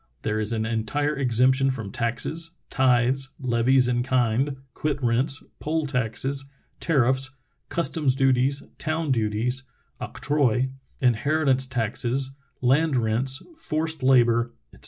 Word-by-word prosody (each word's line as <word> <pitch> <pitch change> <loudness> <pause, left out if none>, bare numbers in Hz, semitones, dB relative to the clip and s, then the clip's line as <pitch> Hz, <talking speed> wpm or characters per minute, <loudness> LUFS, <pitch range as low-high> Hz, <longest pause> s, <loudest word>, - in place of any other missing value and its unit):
There 110 0 -1
is 110 +1 0
an 110 -1 -1
entire 115 +7 -1
exemption 130 +1 +3
from 115 -7 -4
taxes, 130 +7 -2 0.2
tithes, 130 +1 +2
levies 125 0 +3
in 120 -1 +1
kind, 130 +2 +1 0.2
quit 150 -2 -1
rents, 130 +5 +1 0.2
poll 160 0 -1
taxes, 135 +1 -1 0.3
tariffs, 135 -3 +2 0.4
customs 155 -5 0
duties, 135 +1 +2 0.2
town 155 -1 -1
duties 115 +2 0 0.4
(octroi), 130 -3 0 0.3
inheritance 130 +2 +2
taxes, 125 +2 -1 0.3
land 140 +4 +3
rents, 120 +4 0
forced 160 - -2
labor, 120 -2 +4 0.2
etc. - - -17
130 Hz, 115 wpm, -25 LUFS, 120-140 Hz, 0.4 s, labor